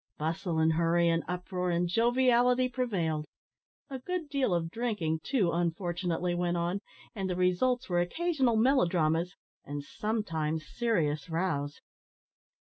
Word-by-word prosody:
Bustle, 160 +2 -2
and 160 0 +3
hurry, 170 +1 +3
and 165 0 +1
uproar, 180 0 -2
and 175 0 +1
joviality 245 +4 +3
prevailed. 195 -12 -1 0.7
A 265 - -4
good 345 +2 -4
deal 275 -7 +1
of 165 -1 0
drinking, 205 -9 -1
too, 210 -11 +1
unfortunately, 175 0 -1
went 175 0 0
on, 175 +3 -1 0.3
and 195 -3 -3
the 180 - -1
results 185 +8 +1
were 175 -2 +2
occasional 270 - +1
melodramas, 175 - +2 0.3
and 145 0 -5
sometimes 160 -7 -2
serious 165 -11 -1
rows. 160 -4 -2
180 Hz, 125 wpm, -30 LUFS, 165-235 Hz, 0.7 s, and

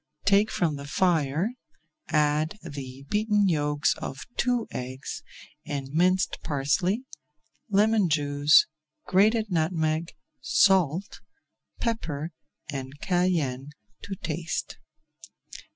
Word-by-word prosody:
Take 200 +2 +4
from 160 -5 0
the 140 0 -8
fire, 165 - +1 0.6
add 150 +4 +1
the 140 -4 -8
beaten 210 -1 +2
yolks 145 -3 +1
of 135 - -6
two 245 -2 +1
eggs, 130 +2 -5 0.4
and 140 -2 -4
minced 180 +5 +2
parsley, 160 - 0 0.7
lemon 210 -1 +3
juice, 145 -1 +4 0.4
grated 215 +3 +3
nutmeg, 160 -1 0 0.3
salt, 190 -1 +2 0.6
pepper, 165 -9 -2 0.4
and 135 0 -6
cayenne 160 -8 0 0.3
to 200 - -5
taste. 165 -1 -4
160 Hz, 90 wpm, -27 LUFS, 145-195 Hz, 0.7 s, Take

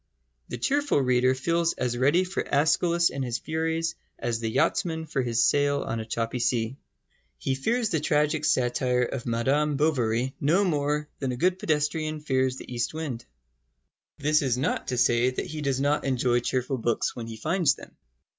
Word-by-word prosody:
The - - -4
cheerful 285 - +1
reader 130 -1 +3
feels 170 +5 +1
as 125 -1 -2
ready 140 +9 +3
for 185 +1 -3
Æschylus 170 +4 +2
and 135 0 -3
his 120 -1 -2
furies 160 +3 -2 0.2
as 120 -2 -2
the 115 -1 -2
yachtsman 160 +7 0
for 145 -3 -1
his 120 -2 +1
sail 145 0 +2
on 115 - -3
a 110 - -5
choppy 115 +2 -2
sea. 120 +1 0 0.6
He 135 - -1
fears 225 - 0
the 160 - +1
tragic 150 +1 +1
satire 125 -2 +1
of 125 0 -4
Madame 140 +5 +1
Bovary 130 -4 +1
no 170 +8 +3
more 150 -3 0
than 135 -2 -1
a 125 - -4
good 180 +6 +1
pedestrian 155 0 -1
fears 130 -3 0
the 125 - -9
east 120 +4 -2
wind. 135 -7 -5 0.9
This 150 +1 +2
is 130 -4 0
not 130 - -1
to 125 - -2
say 120 +1 +3
that 130 - -4
he 155 0 -6
does 135 -2 0
not 145 +2 +1
enjoy 125 -2 +1
cheerful 130 +2 -2
books 115 0 0
when 115 -2 -6
he 115 -1 -7
finds 165 - +2
them. - - -14
140 Hz, 180 wpm, -26 LUFS, 125-155 Hz, 0.9 s, reader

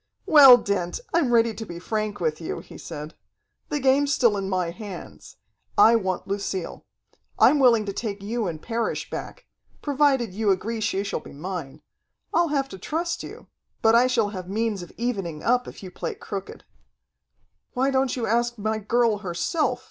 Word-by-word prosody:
"Well, 275 -5 +9
Dent, 195 -6 -2
I'm 315 -7 +2
ready 230 -1 +4
to 225 - -6
be 170 -5 -8
frank 215 +3 -3
with 160 -2 -1
you," 160 - -4
he - - -14
said. 150 -1 -8 0.6
"The 295 - -1
game's 275 +2 +3
still 235 -6 +3
in 195 -1 -3
my 180 -3 -1
hands. 195 -1 -10 0.4
I 230 - +7
want 190 -5 -1
Lucille. 195 -2 -4 0.5
I'm 295 - +5
willing 235 -5 +5
to 200 - -4
take 205 -3 -4
you 225 0 -2
and 160 -3 -4
Parrish 230 +5 -3
back, - - -7 0.4
provided 275 -7 +2
you 215 +1 0
agree 220 +4 0
she 200 -2 0
shall 200 - -3
be - - -13
mine. 160 -2 -6 0.5
I'll 340 0 +3
have 280 -3 0
to 190 - -9
trust 335 - -2
you, - - -10 0.4
but 225 0 +5
I 240 +2 +5
shall 235 -5 +1
have 185 -3 -7
means 215 -1 -1
of 175 - -10
evening 195 -10 -3
up 245 +2 +2
if - - -10
you 185 - -8
play - - -5
crooked." 195 -1 -7 1.1
"Why 265 +2 +1
don't 265 -1 +1
you 240 -3 -2
ask 240 +2 0
my 215 +1 -1
girl 225 0 +1
herself?" 195 - -1
220 Hz, 180 wpm, -24 LUFS, 190-245 Hz, 1.1 s, Well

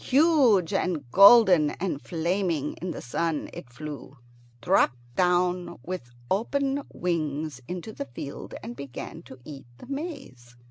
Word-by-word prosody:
Huge 265 - +4
and 170 -8 -1
golden 195 - +8
and 175 -6 -2
flaming 170 -3 -1
in 180 - -3
the - - -6
sun, 155 +5 -2
it 125 - -9
flew, 140 +1 -9 0.4
dropped 125 +1 +2 0.2
down 180 0 +1
with 180 -7 -6 0.2
open 275 +7 0
wings 155 -5 -2
into 180 +4 -6
the 140 - -5
field, 140 +3 -8
and 235 +2 -7
began 140 +4 -8
to 130 - -13
eat 140 -5 -10
the - - -12
maize. 250 - -7
175 Hz, 135 wpm, -26 LUFS, 145-200 Hz, 0.4 s, golden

